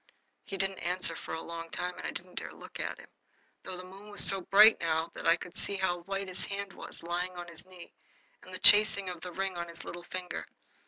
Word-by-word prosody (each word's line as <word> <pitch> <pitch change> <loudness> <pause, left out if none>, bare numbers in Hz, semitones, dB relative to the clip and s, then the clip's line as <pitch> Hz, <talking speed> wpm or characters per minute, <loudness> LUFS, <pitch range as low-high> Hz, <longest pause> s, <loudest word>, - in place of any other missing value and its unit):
He 195 - -5
didn't 195 0 -1
answer 175 -1 +1
for - - -6
a 160 - -6
long 165 0 -7
time, 180 +2 -3
and - - -4
I - - -3
didn't 180 +1 -8
dare - - -8
look - - -11
at - - -3
him, - - -14 0.5
though 185 -1 -7
the 180 - -8
moon 195 +3 -12
was 205 - +4
so 195 -1 +5
bright 210 +4 +7
now 165 0 0
that - - -4
I 165 - +6
could 175 0 -10
see 200 - -1
how 190 -2 0
white 195 +2 -4
his 185 -1 -3
hand 200 -1 -5
was, - - -10
lying 175 +2 -2
on 175 0 -6
his 170 +2 -9
knee, 180 -2 -14 0.5
and - - -14
the - - -5
chasing 205 -2 +7
of 175 -2 -9
the 180 - -7
ring 190 +1 -3
on 170 0 -4
his 170 - -9
little 175 0 -7
finger. 185 -1 -5
180 Hz, 245 wpm, -31 LUFS, 170-195 Hz, 0.5 s, bright